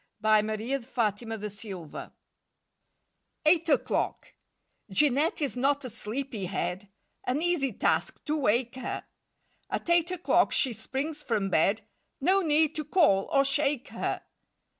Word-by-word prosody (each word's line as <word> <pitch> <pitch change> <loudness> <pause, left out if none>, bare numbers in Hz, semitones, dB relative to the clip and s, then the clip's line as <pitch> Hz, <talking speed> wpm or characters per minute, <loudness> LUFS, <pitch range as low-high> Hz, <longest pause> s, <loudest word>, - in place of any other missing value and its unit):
1 215 0 +3
A 215 - -1
PARIS 245 +3 -3
PAIR 230 -4 +3 0.2
A 225 - -2
PARIS 210 -1 -6
PAIR 185 -8 -8 1.3
EIGHT 330 +1 +4
O'CLOCK 290 - 0 0.6
J 200 +10 +4
EANETTE 295 +4 0
is 280 - -2
not 275 +2 +1
a 250 - -6
sleepy 225 -1 -4
head; 185 +1 -3 0.4
An 255 +3 0
easy 340 -7 +2
task, - - 0
to 300 - 0
wake 240 -3 +1
her! 260 - -4 0.6
At - - -3
eight 345 0 +4
o'clock 365 -1 +2
she 260 -4 +2
springs 275 +8 -4
from 205 -8 -1
bed 195 +7 +2 0.4
No 375 +7 +3
need 310 -2 +3
to 305 - -1
call 295 - +3
or 275 -1 +4
shake 280 -1 +1
her. - - -3
260 Hz, 145 wpm, -28 LUFS, 215-300 Hz, 1.3 s, EIGHT